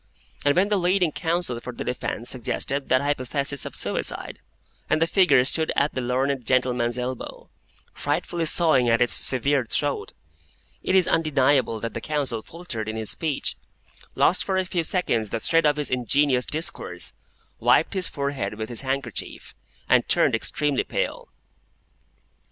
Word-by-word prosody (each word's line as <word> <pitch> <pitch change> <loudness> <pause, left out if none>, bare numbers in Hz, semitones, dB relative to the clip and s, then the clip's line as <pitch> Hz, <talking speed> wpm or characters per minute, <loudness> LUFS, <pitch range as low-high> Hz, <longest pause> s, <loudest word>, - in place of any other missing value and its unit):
When 185 +7 +2
the 205 - +2
leading 180 -2 +2
counsel 165 -8 -2
for 125 - -7
the - - -5
defence 125 -1 -3
suggested 135 +2 -1
that 130 - +4
hypothesis 140 0 0
of - - -9
suicide, - - -2 0.5
and - - +2
the 165 - +3
figure 165 -7 +4
stood 160 +3 0
at 145 +2 +1
the 130 - -2
learned 130 +2 -1
gentleman's 125 -1 +1
elbow, 125 0 -6 0.4
frightfully 170 -2 -2
sawing 155 -7 +4
at 115 0 +3
its 120 - +3
severed 130 -1 +1
throat, 145 -1 -1 0.7
it 190 - 0
is 185 -2 +4
undeniable 140 -7 +2
that 115 -2 -4
the - - -5
counsel 140 -7 -2
faltered 115 -9 -6
in 110 - -4
his 110 -1 -1
speech, 155 -4 0 0.6
lost 185 - +3
for 190 -1 -1
a 190 - +1
few 180 -1 -1
seconds 120 - 0
the 115 - -2
thread 165 +5 +3
of 150 0 +2
his 150 - -1
ingenious 125 +1 +2
discourse, 160 +2 -3 0.5
wiped - - +3
his 190 -2 0
forehead 140 -8 -3
with 110 +1 -5
his 120 - -2
handkerchief, 135 +1 -4 0.3
and - - +3
turned - - +3
extremely 145 -1 0
pale. - - -3
140 Hz, 155 wpm, -24 LUFS, 125-165 Hz, 0.7 s, that